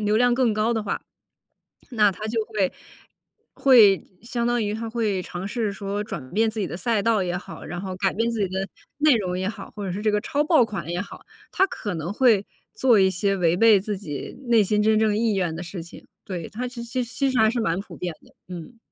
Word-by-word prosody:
流 210 +1 +3
量 245 +1 +4
更 245 -3 +2
高 215 +2 +1
的 220 -2 -1
话， 200 - -3 0.9
那 210 -4 +4
他 210 +3 -6
就 225 0 0
会 210 -5 -1 0.8
会 225 -8 +6 0.2
相 235 0 -2
当 240 0 +1
于 205 0 -1
他 225 +1 -4
会 215 -5 -1
尝 180 +2 -6
试 215 -1 -1
说 200 +1 -3
转 140 -10 -7
变 220 +3 +2
自 220 0 -5
己 195 - -1
的 - - -6
赛 220 +3 0
道 220 -2 +2
也 175 -1 -2
好， - - -10
然 175 +2 -5
后 190 0 -5
改 190 0 +1
变 230 +3 0
自 230 -1 -3
己 195 - +1
的 190 +1 -3 0.3
内 295 -2 +5
容 185 -4 -2
也 190 - -1
好， 210 - -7
或 205 -2 -5
者 180 - -3
是 200 - -4
这 215 0 +2
个 210 - +2
抄 290 +6 0
爆 300 -5 +4
款 180 -8 -6
也 175 +1 -2
好， 200 - -11 0.3
他 385 - +4
可 205 - -5
能 165 +1 -4
会 220 -4 +4 0.3
做 245 -5 +4
一 190 0 +5
些 195 +2 0
违 170 -2 +2
背 220 -1 +6
自 205 +1 -3
己 150 -8 -6
内 230 -2 +6
心 210 +2 +1
真 215 0 +4
正 215 -1 +2
意 220 -2 +1
愿 175 -4 -1
的 175 - -5
事 175 0 -6
情。 170 - -13 0.2
对， 175 -4 -5
它 245 +4 -4
其 245 -1 -7
实 245 +1 -2
其 265 +3 -1
实 255 - +1
还 220 0 +5
是 240 +1 -1
蛮 170 -3 0
普 200 - -9
遍 180 -2 -3
的， - - -22 0.2
嗯。 180 +8 -9
210 Hz, 260 characters per minute, -24 LUFS, 190-230 Hz, 0.9 s, 会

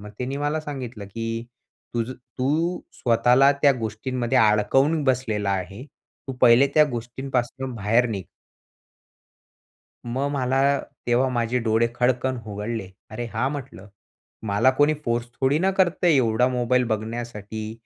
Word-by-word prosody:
मग 105 0 -10
त्यानी 130 +2 -3
मला 145 +2 -1
सांगितलं, 125 -8 -7
की 115 +2 -4 0.5
तुझं 120 +2 -1 0.3
तू 160 +7 0 0.2
स्वतःला 125 +3 +4
त्या 140 -1 +6
गोष्टींमध्ये 120 +3 -1
अडकवून 135 +9 +3
बसलेला 115 -6 0
आहे. 95 +5 -4 0.4
तू - - -2
पहिले 120 +4 +7
त्या 155 -1 +7
गोष्टींपासनं 125 +1 -3
बाहेर 115 +3 +2
निघ. 95 -4 -4 1.8
मग 130 +4 -1
मला 130 -1 0 0.5
तेव्हा 125 +2 +2
माझे 120 0 0
डोळे 115 +1 +2
खडकन 125 +1 +1
उघडले. 105 -1 -4 0.2
"अरे 120 +2 -5
हां!" 125 +5 0
म्हटलं, 110 - -8 0.6
"मला 105 +6 +3
कोणी 145 +1 +4
फोर्स 120 0 -1
थोडी 135 +3 +3
ना 190 +2 +2
करतय 185 -2 +2
एवढा 125 0 +3
मोबाईल 125 0 +1
बघण्यासाठी." 110 -1 -5
120 Hz, 130 wpm, -24 LUFS, 110-135 Hz, 1.8 s, पहिले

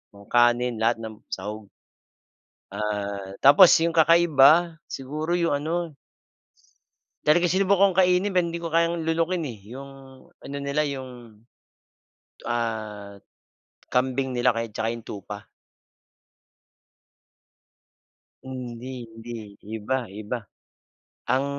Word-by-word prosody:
nung 100 - -14
kanin, 120 -1 +3
lahat 115 +1 +2
ng 110 -1 -8
sahog. 105 +2 -6 1.0
Ah, 100 -2 -4
tapos, 145 +7 +9 0.2
yung 170 - +2
kakaiba, 165 0 +5
siguro 155 +6 -3
yung 170 -1 +1
ano 160 +3 -1 1.3
talagang 170 +3 +3
sinubukan 195 0 +3
kong - - -12
kainin, 180 +2 +2
pero 180 -2 +3
hindi 170 - -4
ko 165 - -4
kayang 170 -1 +1
lunukin 165 +1 0
eh, 115 -6 -7
'yong 135 +2 -9 0.5
ano 140 - -7
nila, 140 +2 -1
'yong, 125 -6 -6 1.1
ah, 110 -4 -4 0.7
kambing 130 +1 0
nila 120 +1 +3
kaya 115 0 -2
at 105 - -18
tsaka 115 0 -1
yung 115 -1 -7
tupa. 105 0 -8 3.0
Hindi, 125 -1 -7
hindi, 115 -2 -9 0.2
iba 115 +2 -3
iba. 110 +4 -5 0.9
Ang 135 +2 +2
130 Hz, 110 wpm, -25 LUFS, 110-165 Hz, 3.0 s, tapos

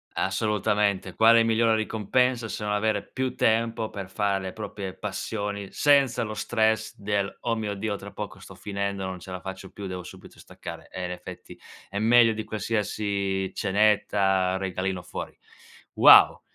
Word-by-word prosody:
Assolutamente. 100 -1 0
Quale 115 +1 +6
migliore 115 0 +3
ricompensa 115 +2 0
se 105 - -5
non 105 - -1
avere 105 -1 +1
più 130 0 -3
tempo 115 0 +1
per 95 -2 -7
fare 100 0 0
le 95 - -4
proprie 100 -3 -6
passioni 100 -1 -4
senza 140 -5 +3
lo 110 -1 -4
stress 110 0 0
del: 100 -1 -1
"Oh 115 -1 0
mio 105 -2 -3
Dio, 100 +1 -2
tra - - -9
poco - - -7
sto - - -12
finendo, 100 -1 -4
non 95 -1 -5
ce 95 - -10
la 90 - -5
faccio 95 +1 -8
più, 100 -1 -7
devo 90 -1 -6
subito - - -13
staccare"? - - -10
Eh, 90 - -5
in 90 - -4
effetti, 90 0 -9 0.3
è 100 - -5
meglio 115 0 +5
di 110 0 -4
qualsiasi 100 -3 -2
cenetta, 95 -2 +2
regalino 95 -1 -3
fuori. - - -7 0.6
Wow. - - +8
105 Hz, 160 wpm, -26 LUFS, 95-110 Hz, 0.6 s, Wow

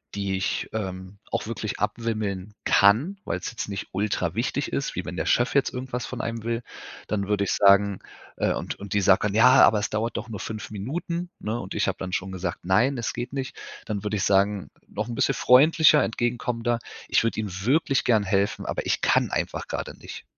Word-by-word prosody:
die 100 -1 -1
ich, 95 - -1
ähm, 95 -2 -5
auch - - -1
wirklich 110 -2 -4
abwimmeln 105 -2 -2
kann, 120 - +4
weil's - - -3
jetzt 115 - -5
nicht 100 -1 -5
ultra 100 +2 -1
wichtig - - -2
ist, - - -2
wie - - -3
wenn - - -5
der - - -2
Chef 120 +1 +2
jetzt 140 - +3
irgendwas 125 -1 -4
von - - -6
einem 115 -1 -4
will, 115 +1 -2 0.4
dann 100 -2 -1
würde 105 -1 +1
ich - - 0
sagen 100 0 +4 0.4
äh, - - +1
und - - -4
und 100 -2 -9
die 100 - +2
sagt 95 0 +4
dann: 105 -1 0
„Ja, 125 +4 +7
aber 110 - +6
es 105 - -2
dauert 110 +1 -1
doch 120 - -5
nur 105 -3 -6
5 110 +1 -6
Minuten.", 170 - -4
ne? 110 +2 -3
Und 95 - -7
ich 105 - +1
habe 95 - -1
dann 95 -1 -5
schon 95 +1 -2
gesagt: 90 -2 -4
„Nein, 120 +9 +3
es 115 -1 -2
geht 120 +1 -5
nicht." 135 -2 -4 0.3
Dann 105 -3 -4
würde 105 0 -1
ich 95 - -1
sagen, 100 0 +2 0.2
noch 105 +2 -4
'n 120 - -5
bisschen 135 - +2
freundlicher, 150 +5 +6
entgegenkommender: 120 0 -1 0.3
„Ich - - +3
würde 115 -1 -1
Ihnen 105 -3 -3
wirklich 135 -2 +2
gern 110 -4 +3
helfen, 100 0 0
aber - - -3
ich - - 0
kann - - +3
einfach - - -2
grade - - -5
nicht." - - -10
110 Hz, 210 wpm, -25 LUFS, 100-120 Hz, 0.4 s, Ja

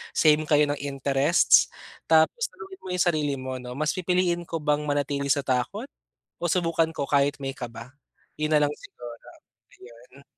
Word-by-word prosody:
same 155 -1 +4
kayo 150 -1 +4
ng 145 - -2
interests. 140 +3 +3 0.4
Tapos 160 - +3
tanungin 390 -3 -12
mo - - -11
yung 180 - +2
sarili 150 -4 +1
mo 130 0 -5
'no, 125 0 -8
"Mas 150 +2 0
pipiliin 180 -1 0
ko 165 - -3
bang 150 0 +1
manatili 145 -1 -1
sa 140 0 +1
takot 125 -2 -2 0.5
o - - -10
subukan 165 -1 +1
ko - - -2
kahit 140 0 +2
may 135 0 -3
kaba?" 120 -2 -9 0.5
Yun 155 0 0
nalang 145 -1 +3
siguro, 120 - -12 0.7
iyon. 125 +3 -16
145 Hz, 160 wpm, -25 LUFS, 135-160 Hz, 0.7 s, same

